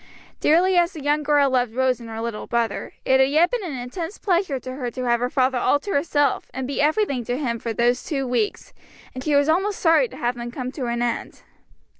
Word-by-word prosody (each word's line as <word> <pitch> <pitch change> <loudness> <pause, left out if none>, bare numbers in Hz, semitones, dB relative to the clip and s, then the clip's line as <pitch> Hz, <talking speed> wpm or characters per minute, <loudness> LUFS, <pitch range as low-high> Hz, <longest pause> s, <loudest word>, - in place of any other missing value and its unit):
Dearly 355 +4 +3
as 345 +2 +3
the 310 -5 -8
young 295 +1 +2
girl 290 -2 +3
loved 245 -3 0
Rose 260 -1 +1
and 230 -1 -10
her 225 0 -6
little 230 -2 -4
brother, 235 -3 -2
it 265 0 +4
had 265 0 +4
yet 320 +5 +3
been - - -2
an 310 -8 -4
intense 325 +10 -6
pleasure 350 -8 0
to 255 0 -7
her 255 -2 -4
to 255 +1 -6
have 240 -1 +2
her 245 +1 -1
father 260 -1 +1
all 285 - +2
to 405 - -6
herself, 290 -3 +1
and 265 - -3
be 275 +2 -2
everything 300 - +1
to 245 +2 -2
him 235 -5 -2
for 230 - -4
those 240 +2 +1
two 275 -4 -2
weeks; 245 -4 -2 0.4
and 255 - -6
she 300 -1 +1
was 285 0 +4
almost 385 +5 +1
sorry 330 +9 +4
to - - -12
have 240 +1 0
them 240 0 -6
come 255 +1 -5
to 260 -3 -4
an 235 0 -1
end. 240 - -3
265 Hz, 240 wpm, -23 LUFS, 245-310 Hz, 0.4 s, it